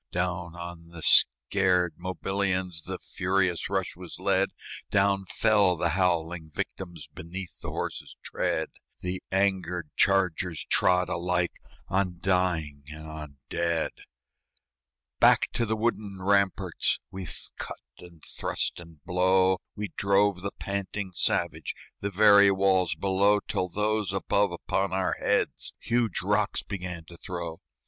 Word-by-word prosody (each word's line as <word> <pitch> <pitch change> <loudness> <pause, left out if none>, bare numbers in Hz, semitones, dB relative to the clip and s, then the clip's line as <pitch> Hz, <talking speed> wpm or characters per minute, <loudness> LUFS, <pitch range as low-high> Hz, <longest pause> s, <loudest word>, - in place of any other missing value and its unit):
Down 90 -1 -2
on 85 -1 -8
the 85 -2 -9
scared 90 +8 +4
Mobilians 95 -2 -2
The - - -4
furious 95 -2 0
rush 95 -2 -1
was 90 -1 -9
led; 95 +1 +2 0.4
Down 100 -1 +2
fell 105 -5 +4
the 85 +1 +1
howling 85 -2 0
victims 85 0 -6
Beneath 90 +2 -8
the - - -4
horses' - - -5
tread; - - -1 0.3
The 90 +1 -3
angered 90 -4 0
chargers 90 -4 +2
trod 90 -1 +3
alike 90 0 0 0.3
On 95 -2 0
dying 85 -6 0
and 80 0 -9
on 75 -2 -8
dead. 85 0 0 1.3
Back - - +5
to 115 - 0
the 110 - +1
wooden 105 -4 -2
ramparts, 100 -2 +2
With 95 -2 -2
cut - - -5 0.2
and 85 -3 -14
thrust - - -2
and 80 -3 -14
blow, 95 +1 +3 0.2
We 105 -1 -4
drove 100 -1 +3
the 100 +1 -3
panting 100 0 -3
savage, - - 0 0.2
The 100 - -2
very 100 0 +7
walls 95 -2 +3
below, 100 +2 +3
Till 90 -2 -2
those 105 0 0
above 100 0 +1
upon 95 +2 -1
our 95 0 +1
heads - - 0
Huge 115 -4 0
rocks - - +1
began 90 -4 -6
to 85 +1 -13
throw. 85 -2 -5
95 Hz, 130 wpm, -28 LUFS, 85-100 Hz, 1.3 s, very